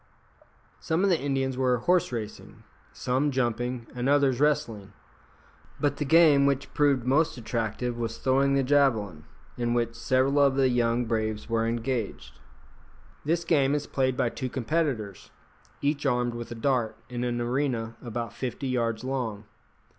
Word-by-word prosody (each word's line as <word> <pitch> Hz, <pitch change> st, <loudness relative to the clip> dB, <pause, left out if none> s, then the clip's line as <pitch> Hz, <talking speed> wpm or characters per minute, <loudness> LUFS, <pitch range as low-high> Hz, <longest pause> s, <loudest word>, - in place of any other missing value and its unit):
Some 160 Hz, +4 st, 0 dB
of 200 Hz, -, +3 dB
the 170 Hz, -, +2 dB
Indians 135 Hz, -2 st, -1 dB
were 125 Hz, -1 st, +2 dB
horse 175 Hz, +7 st, +1 dB
racing, 110 Hz, -3 st, -7 dB, 0.3 s
some 130 Hz, +4 st, 0 dB
jumping, 120 Hz, -2 st, -1 dB
and 125 Hz, +1 st, -1 dB
others 140 Hz, -3 st, +3 dB
wrestling; 130 Hz, -9 st, 0 dB, 0.9 s
but 145 Hz, -1 st, 0 dB
the 150 Hz, -, -2 dB
game 145 Hz, -2 st, +6 dB
which 140 Hz, -1 st, -1 dB
proved 140 Hz, -4 st, +2 dB
most 150 Hz, +3 st, +2 dB
attractive 115 Hz, +1 st, -3 dB
was 115 Hz, -1 st, -3 dB
throwing 135 Hz, +1 st, +2 dB
the 135 Hz, -, +2 dB
javelin, 115 Hz, -, +1 dB, 0.3 s
in 120 Hz, 0 st, 0 dB
which 115 Hz, -1 st, 0 dB
several 130 Hz, +4 st, +1 dB
of 140 Hz, -2 st, +4 dB
the 135 Hz, -1 st, +3 dB
young 120 Hz, 0 st, +1 dB
braves 110 Hz, -2 st, -2 dB
were 115 Hz, 0 st, 0 dB
engaged. 115 Hz, -1 st, -3 dB, 0.9 s
This 165 Hz, +2 st, 0 dB
game 145 Hz, -4 st, +3 dB
is 145 Hz, -1 st, -2 dB
played 130 Hz, -2 st, 0 dB
by 120 Hz, -, +1 dB
two 130 Hz, +2 st, -5 dB
competitors, 125 Hz, -, -2 dB, 0.5 s
each 145 Hz, 0 st, 0 dB
armed 120 Hz, -2 st, +1 dB
with 120 Hz, 0 st, -6 dB
a 120 Hz, -, -6 dB
dart, 120 Hz, -1 st, 0 dB
in 120 Hz, -1 st, -4 dB
an 120 Hz, -1 st, -1 dB
arena 120 Hz, -2 st, -1 dB
about 120 Hz, -2 st, -5 dB
fifty 130 Hz, +1 st, -4 dB
yards 115 Hz, -3 st, -1 dB
long. 125 Hz, -6 st, -3 dB
125 Hz, 155 wpm, -27 LUFS, 115-140 Hz, 0.9 s, game